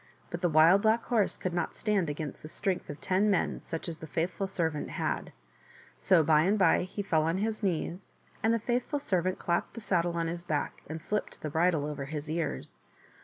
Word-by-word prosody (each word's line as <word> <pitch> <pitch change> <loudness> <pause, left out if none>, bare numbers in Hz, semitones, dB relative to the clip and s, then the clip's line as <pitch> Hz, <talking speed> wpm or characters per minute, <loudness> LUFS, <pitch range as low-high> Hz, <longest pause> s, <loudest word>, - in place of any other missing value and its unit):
But 175 - -4
the 175 - +2
Wild 165 +5 +6
Black 220 +2 +3
Horse 220 -5 +1
could 185 - -3
not 175 - -2
stand 205 -7 +1
against 150 0 -5
the - - -8
strength 190 +1 -2
of 145 - -6
ten 195 +3 +2
men, 195 - +1
such 165 +1 -5
as 165 -2 -5
the 160 - -8
faithful 175 +5 -1
servant 165 -5 -2
had, - - -2 0.7
so 185 -4 +4
by 150 0 +5
and 195 +6 +3
by 185 -5 +4
he 200 +2 -5
fell 160 -5 +2
on 165 +3 +1
his 215 +2 -1
knees, 180 -1 -2 0.3
and 225 - +3
the 230 - +3
faithful 245 +5 -1
servant 185 - 0
clapped 170 0 -1
the - - -5
saddle 175 -5 +1
on 165 - 0
his 170 +1 -4
back 155 -4 -2
and 160 +1 -4
slipped 210 +6 -3
the 155 - -3
bridle 160 -2 +2
over 145 -2 -4
his 150 +1 -5
ears. 160 - -3
175 Hz, 210 wpm, -30 LUFS, 160-200 Hz, 0.7 s, Wild